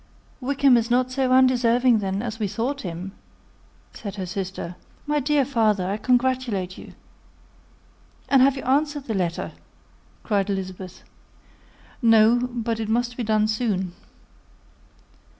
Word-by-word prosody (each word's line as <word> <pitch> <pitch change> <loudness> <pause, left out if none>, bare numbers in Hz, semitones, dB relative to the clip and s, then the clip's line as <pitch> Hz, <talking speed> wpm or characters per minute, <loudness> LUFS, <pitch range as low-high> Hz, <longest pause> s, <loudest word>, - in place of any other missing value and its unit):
"Wickham 270 -1 +3
is 230 0 -1
not 250 +1 +2
so 260 -1 0
undeserving, 250 -2 +4
then, 195 +1 -2
as 225 -2 -5
we 210 - 0
have 200 - -9
thought 275 +5 -2
him," 180 +1 -6 0.8
said 200 -3 -7
her 190 -2 -4
sister. 185 -1 -5 0.3
"My 295 0 +1
dear 285 0 +2
father, 215 -8 +1
I 200 +2 -1
congratulate 245 -6 0
you." - - -12 1.3
"And 270 -2 +4
have 275 +1 +4
you - - -6
answered 290 +2 0
the 230 - -4
letter?" 175 -4 -2 0.8
said 205 -2 +1
Elizabeth. 185 -1 -5 1.0
"No; 230 +1 +5
but 230 -2 -3
it 220 -1 -3
must 240 +2 0
be 245 - -4
done 215 -1 +2
soon." 215 -5 -1
230 Hz, 135 wpm, -23 LUFS, 200-255 Hz, 1.3 s, No